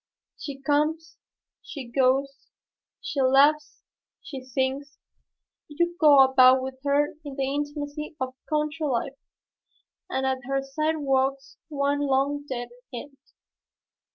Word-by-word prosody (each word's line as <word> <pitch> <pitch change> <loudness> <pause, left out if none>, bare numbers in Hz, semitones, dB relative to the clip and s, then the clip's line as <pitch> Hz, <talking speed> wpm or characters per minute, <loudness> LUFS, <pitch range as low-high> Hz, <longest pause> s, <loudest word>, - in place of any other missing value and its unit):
She 275 -2 -7
comes, 300 +4 -1 0.4
she 275 -4 -8
goes, 270 +2 0 0.5
she 280 - -2
laughs, 285 +3 +3 0.4
she 270 -4 -9
sings, 265 +2 -3 0.7
you 345 +3 -1
go 290 -4 +8
about 260 0 +5
with 260 0 -6
her 290 +1 +1
in 285 -2 -7
the 270 0 -1
intimacy 290 +1 -4
of 260 0 -3 0.2
country 305 0 -1
life, 270 +2 -2 0.9
and 265 - -1
at 265 0 0
her 270 +1 -1
side 305 +4 -1
walks 270 -1 -1
one 285 -1 0
long 285 +1 0
dead. 245 -2 -4
280 Hz, 115 wpm, -25 LUFS, 265-295 Hz, 0.9 s, go